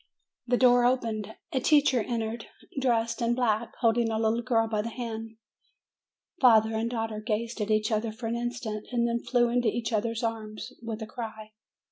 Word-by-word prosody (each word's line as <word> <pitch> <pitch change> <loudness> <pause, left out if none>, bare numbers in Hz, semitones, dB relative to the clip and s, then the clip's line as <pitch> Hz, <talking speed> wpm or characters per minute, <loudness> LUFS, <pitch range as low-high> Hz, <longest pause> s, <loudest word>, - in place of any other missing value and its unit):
The 245 0 +3
door 245 -1 +5
opened; 230 -4 0 0.2
a 265 - +1
teacher 280 -2 +4
entered, 225 0 -3 0.3
dressed 230 -3 +1
in 235 0 +2
black, 235 -2 0
holding 230 0 +3
a 220 - -1
little 225 +1 +1
girl 230 -2 +2
by 215 -1 0
the 230 - -4
hand. 225 -2 -6 1.0
Father 225 -3 +5
and 225 +1 -1
daughter 225 -2 -3
gazed 225 +1 -2
at 210 - -2
each 215 +1 +2
other 220 +1 0
for 225 +2 -8
an 230 +1 -1
instant; 235 -3 -4
then 235 -1 +1
flew 240 -2 +2
into 240 0 +1
each 225 +1 -1
other's 225 +2 -1
arms, 220 -2 -4
with 225 -1 -5
a - - -4
cry. 215 -1 -7
230 Hz, 175 wpm, -28 LUFS, 220-240 Hz, 1.0 s, door